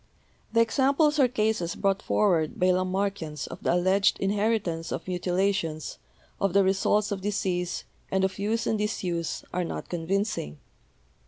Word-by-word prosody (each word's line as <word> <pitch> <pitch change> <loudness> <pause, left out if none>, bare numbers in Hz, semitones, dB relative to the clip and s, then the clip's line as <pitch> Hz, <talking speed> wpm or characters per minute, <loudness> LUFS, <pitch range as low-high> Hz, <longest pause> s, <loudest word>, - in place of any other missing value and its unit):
The 230 - +4
examples 280 +6 +3
or 265 - +6
cases 215 -7 0
brought 195 0 +1
forward 170 -7 +1
by 185 0 +4
Lamarckians 185 -4 -1
of 170 - -9
the - - +2
alleged 190 +3 +3
inheritance 195 -4 0
of - - -4
mutilations, 180 -3 -1 0.4
of 195 -3 +1
the 200 0 +5
results 195 +2 +2
of 195 -2 -2
disease, 185 -3 -1 0.3
and 190 0 +1
of 190 +1 -1
use 220 +3 0
and 220 - 0
disuse, 180 -6 -2
are 180 0 0
not 170 - -5
convincing. 175 - -2
195 Hz, 145 wpm, -27 LUFS, 175-210 Hz, 0.4 s, or